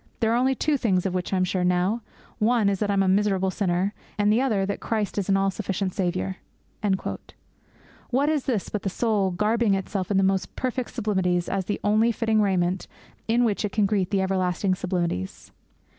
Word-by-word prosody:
There 225 0 +2
are - - +3
only 260 +2 +2
two 300 +2 +1
things 190 -7 +1
of 190 - -1
which 180 -1 -2
I 190 - +1
am 185 - +2
sure 185 0 0
now; 180 +6 +1 0.4
one 220 -1 +3
is 195 -2 -1
that 210 - 0
I - - +2
am 195 -1 +3
a - - +1
miserable 190 -1 +2
sinner, 185 0 0 0.2
and 205 0 +3
the 235 - +3
other 215 -8 +1
that 200 - -3
Christ 215 -2 -2
is 200 - -3
an 195 - +4
all 195 0 +2
sufficient 195 -1 -3
Saviour.' 185 -1 -2 1.7
What 270 +4 +2
is 300 -3 0
this 230 -7 -1
but 210 - -3
the 195 - -1
soul 205 -1 +1
garbing 210 +3 +2
itself 190 -1 -3
in 200 - +2
the 195 - +4
most 190 0 0
perfect 255 -1 -2
simplicities 190 -6 0
as 190 -1 -1
the 205 - -2
only 215 +3 +3
fitting 220 -1 +1
raiment 185 -2 0 0.4
in 235 +2 +3
which 220 -3 0
it 210 - -2
can 210 -2 +3
greet 195 -3 0
the 195 -2 +1
everlasting 185 0 0
sublimities? 175 - -3
200 Hz, 205 wpm, -25 LUFS, 185-220 Hz, 1.7 s, an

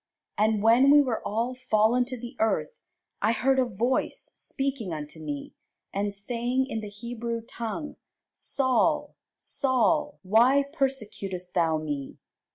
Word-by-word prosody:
And 215 0 +2
when 235 +5 +6
we 290 +1 +8
were 255 -6 +1
all 230 +4 -1
fallen 245 -1 +2
to 255 0 -6
the 240 0 -8
earth, 220 - +1 0.5
I 225 - +3
heard 265 +3 +2
a 255 - +4
voice 240 +3 -1
speaking 270 -8 -3
unto 155 0 -6
me, 145 -2 -5 0.4
and 200 +1 -1
saying 240 +5 -1
in 225 -4 -4
the 210 - -6
Hebrew 235 +2 -5
tongue, 235 +6 -5 0.4
Saul, 260 -2 +1 0.2
Saul, 285 +3 +1
why 240 +8 +5
persecutest 205 - -3
thou 165 -3 +2
me? 145 -3 -4
230 Hz, 135 wpm, -27 LUFS, 205-260 Hz, 0.5 s, we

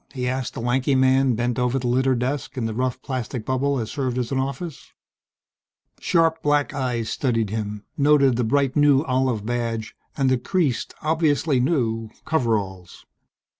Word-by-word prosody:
he 125 -1 -2
asked 130 0 -2
the - - -4
lanky 125 +3 +1
man 130 -1 +3
bent 120 +1 -1
over 125 +1 +1
the 130 - -3
littered 130 +1 +2
desk 130 +3 -3
in 120 - -1
the 110 - -2
rough 125 +2 -1
plastic 125 -3 -4
bubble 135 +2 0
that 120 -4 -1
served 130 0 -3
as 125 -1 -2
an 135 - 0
office. 140 +4 -5 1.1
Sharp 165 -1 +2
black 145 -1 +1
eyes 125 -5 -2
studied 115 -6 -1
him 105 -1 -4
noted 140 -3 +4
the 125 - 0
bright 135 +3 +1
new 145 -1 +4
olive 130 -6 0
badge, 115 -2 -2 0.2
and 135 -2 +2
the 130 -1 +2
creased, 150 -2 -1
obviously 155 -3 +2
new, 115 -5 0 0.2
coveralls. 105 - -2
130 Hz, 165 wpm, -23 LUFS, 120-140 Hz, 1.1 s, noted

